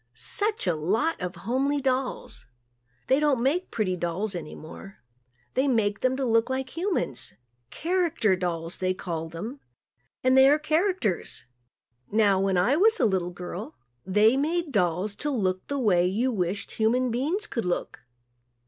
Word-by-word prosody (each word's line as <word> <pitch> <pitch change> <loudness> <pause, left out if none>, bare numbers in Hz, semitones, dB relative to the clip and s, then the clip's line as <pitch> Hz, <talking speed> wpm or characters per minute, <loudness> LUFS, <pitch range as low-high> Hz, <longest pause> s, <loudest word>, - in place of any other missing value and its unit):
Such 420 +1 -1
a 180 - +2
lot 205 - 0
of 180 +1 -4
homely 275 +5 +1
dolls. 255 -2 -2 0.6
They 265 - +3
don't 285 -5 +2
make 330 +8 +1
pretty 195 -5 -1
dolls 180 +4 -2
any 170 -3 -6
more. 175 +5 -11 0.6
They 265 +2 +2
make 210 -6 +1
them 260 0 +1
to 270 - -1
look 230 0 +2
like 260 0 -3
humans. 335 - -2 0.3
"Character" 335 - +1
dolls 170 -2 -4
they 185 0 0
call 165 -4 -4
them 215 - -7 0.6
and 255 0 +4
they 265 +1 +7
are 295 - +5
"characters." 310 - -1 0.7
Now, 205 -3 +3
when 195 -1 +1
I 195 +11 +3
was 445 +5 +4
a - - +4
little 190 -4 +1
girl, 175 -4 -7 0.3
they 210 - +4
made 320 +3 0
dolls 185 0 0
to 295 - -2
look 190 -8 -1
the 285 - -2
way 185 -8 +3
you 230 +8 0
wished 195 -2 -2
human 240 +3 +1
beings 310 - -1
could 230 - -3
look. 175 - -2
225 Hz, 155 wpm, -26 LUFS, 185-275 Hz, 0.7 s, they